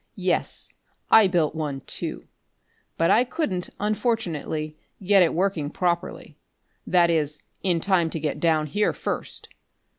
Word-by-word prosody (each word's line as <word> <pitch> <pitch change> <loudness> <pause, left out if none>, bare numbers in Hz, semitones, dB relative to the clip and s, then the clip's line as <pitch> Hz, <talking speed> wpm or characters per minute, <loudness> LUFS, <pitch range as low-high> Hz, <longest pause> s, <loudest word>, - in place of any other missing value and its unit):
Yes, - - -1 0.4
I 220 -3 +8
built 170 -5 +1
one 150 -4 -3
too. - - -5 0.7
But 165 - +3
I 235 - +5
couldn't, 240 - -2
unfortunately, 190 - -1 0.3
get 195 +1 +5
it 170 - +4
working 175 -4 0
properly 175 +1 -2 0.5
that 175 -2 +4
is, 150 -2 -1 0.2
in 175 -3 +1
time 175 -2 +2
to 160 - -4
get 150 -1 -2
down 155 -1 +2
here 205 +8 0
first. - - -4
170 Hz, 130 wpm, -25 LUFS, 155-195 Hz, 0.7 s, I